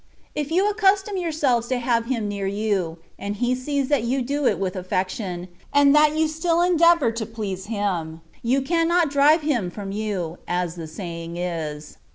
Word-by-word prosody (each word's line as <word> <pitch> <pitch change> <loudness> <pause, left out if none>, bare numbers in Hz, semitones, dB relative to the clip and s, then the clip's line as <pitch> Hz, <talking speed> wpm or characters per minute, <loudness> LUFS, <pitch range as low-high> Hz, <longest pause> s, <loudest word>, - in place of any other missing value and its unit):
If 295 -1 -3
you 370 +5 +2
accustom 405 -1 +2
yourselves 300 -10 0
to 255 - 0
have 235 -1 +1
Him 235 -5 -1
near 200 -1 -3
you, 195 -5 -1 0.2
and 200 +1 -3
He 245 +4 +1
sees 275 +1 -1
that 290 -5 +3
you 250 +3 0
do 280 +2 0
it - - +2
with 190 -2 -2
aflfec 185 0 -1
tion, 180 -3 -5 0.2
and 285 0 +5
that 300 +1 +5
you 315 0 +3
still 330 +2 0
endeavour 340 -6 +4
to 225 -1 -4
please 205 -4 -5
Him, 180 -7 -2 0.2
you 260 +3 +1
cannot 335 +1 +2
drive 290 +3 +5
Him 250 -12 0
from 195 +2 -6
you, 195 -5 -3
as 175 -1 -1
the 165 -2 -7
saying 170 0 -6
is. 155 -4 -4
235 Hz, 185 wpm, -23 LUFS, 185-300 Hz, 0.2 s, and